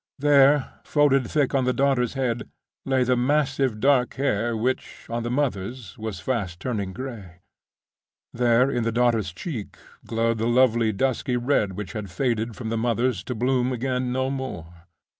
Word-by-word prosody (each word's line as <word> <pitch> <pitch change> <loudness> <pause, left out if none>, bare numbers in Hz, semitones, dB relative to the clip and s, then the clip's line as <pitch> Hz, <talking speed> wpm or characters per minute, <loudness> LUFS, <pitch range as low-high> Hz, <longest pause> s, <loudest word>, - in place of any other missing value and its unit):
There, 145 0 +4
folded 140 -4 +2
thick 145 -4 +1
on 135 -2 +2
the 125 - +2
daughter's 135 -2 +1
head, 125 -3 -2 0.4
lay 130 -1 +3
the 125 0 +2
massive 135 -2 +1
dark 135 -1 +3
hair, 120 -3 0
which, 125 +4 -3
on 120 0 -1
the 120 - -3
mother's, 120 - -2
was 110 -4 -5
fast 95 -5 -2
turning 100 -4 -3
gray. 100 -7 -8 0.9
There, 120 +2 +3
in 120 - 0
the 115 - 0
daughter's 115 -5 +1
cheek, 110 - -6 0.3
glowed 115 0 0
the 115 - 0
lovely 120 -2 +3
dusky 125 +3 0
red 120 -6 +1
which 95 -1 -6
had 105 -3 -5
faded 115 +3 -1
from 115 -3 -5
the 115 0 -1
mother's 120 -3 0
to 125 - -4
bloom 125 +2 +1
again 125 0 -1
no 130 +1 0
more. 85 -11 -7
120 Hz, 160 wpm, -24 LUFS, 110-130 Hz, 0.9 s, There